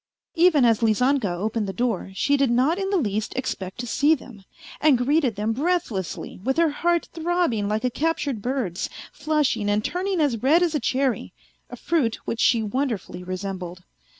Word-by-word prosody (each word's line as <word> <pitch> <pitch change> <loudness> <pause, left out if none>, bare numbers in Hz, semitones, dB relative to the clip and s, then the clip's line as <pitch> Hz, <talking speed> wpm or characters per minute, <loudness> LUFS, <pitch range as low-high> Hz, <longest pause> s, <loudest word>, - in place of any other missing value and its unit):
Even 330 -6 +4
as 230 -1 +3
Lizanka 240 +1 +2
opened 210 +4 -2
the 195 - -4
door 230 -3 -1
she 285 +8 +2
did 275 -2 +2
not 260 +9 +2
in 385 0 -2
the 395 - +2
least 215 - -2
expect 190 -7 -4
to 245 - -3
see 290 +6 +3
them, 240 -8 -13 0.4
and 295 -4 +4
greeted 260 -1 +1
them 215 +2 -1
breathlessly, 260 - -2
with 265 +5 0
her 330 -2 +3
heart 340 +3 0
throbbing 330 - 0
like 215 +2 -1
a 250 - +1
captured 300 -5 -1
bird's, 240 -8 -2 0.2
flushing 295 -8 0
and 210 +1 +1
turning 370 0 -1
as 265 -8 +1
red 315 +7 +4
as 340 -2 +1
a 300 - +1
cherry, 255 - -1 0.4
a - - -7
fruit 275 -10 0
which 230 - -3
she 230 -2 +3
wonderfully 215 -6 -3
resembled. 185 -1 -5
250 Hz, 180 wpm, -24 LUFS, 210-305 Hz, 0.4 s, Even